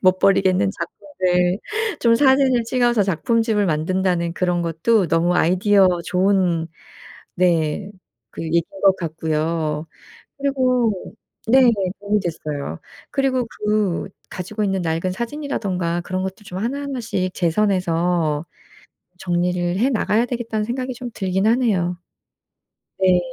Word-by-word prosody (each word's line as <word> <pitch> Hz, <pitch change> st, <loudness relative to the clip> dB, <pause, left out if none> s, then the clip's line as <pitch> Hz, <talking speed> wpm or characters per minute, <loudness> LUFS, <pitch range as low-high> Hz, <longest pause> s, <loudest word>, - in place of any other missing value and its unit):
못 185 Hz, 0 st, +4 dB
버리겠는 190 Hz, -1 st, +3 dB
작품들 185 Hz, -3 st, -1 dB, 0.4 s
좀 230 Hz, -1 st, +4 dB
사진을 265 Hz, -1 st, +4 dB
찍어서 240 Hz, -2 st, +2 dB
작품집을 210 Hz, +3 st, +1 dB
만든다는 170 Hz, +1 st, 0 dB
그런 175 Hz, -1 st, 0 dB
것도 175 Hz, +5 st, +1 dB
너무 165 Hz, +3 st, +2 dB
아이디어 190 Hz, +3 st, +4 dB, 0.2 s
좋은 180 Hz, -2 st, +1 dB, 0.7 s
네 175 Hz, +1 st, +1 dB, 0.4 s
그 -, -, -7 dB
얘기인 165 Hz, +1 st, +2 dB, 0.2 s
것 195 Hz, -1 st, +7 dB
같고요. 160 Hz, -1 st, -2 dB, 0.5 s
그리고 255 Hz, -7 st, 0 dB, 0.3 s
네 255 Hz, +1 st, +6 dB, 0.3 s
도움이 205 Hz, +1 st, 0 dB
됐어요. 150 Hz, -, -4 dB, 0.3 s
그리고 265 Hz, -3 st, +1 dB
그 210 Hz, -5 st, -1 dB, 0.2 s
가지고 205 Hz, +4 st, -4 dB
있는 195 Hz, -2 st, 0 dB
낡은 165 Hz, +2 st, -1 dB
사진이라든가 200 Hz, -, -2 dB
그런 185 Hz, +1 st, -3 dB
것도 190 Hz, +2 st, -6 dB
좀 185 Hz, -, -7 dB
하나하나씩 240 Hz, -5 st, -2 dB
제 170 Hz, -2 st, +1 dB
선에서 170 Hz, -5 st, +1 dB, 0.7 s
'정리를 175 Hz, 0 st, 0 dB
해 245 Hz, +7 st, +2 dB
나가야 225 Hz, 0 st, +1 dB
되겠다.'는 230 Hz, -3 st, -3 dB
생각이 255 Hz, +2 st, -3 dB
좀 245 Hz, -1 st, -7 dB
들긴 190 Hz, 0 st, -1 dB
하네요. 205 Hz, -7 st, +1 dB, 1.0 s
네. 185 Hz, -1 st, +5 dB
190 Hz, 275 characters per minute, -21 LUFS, 175-230 Hz, 1.0 s, 것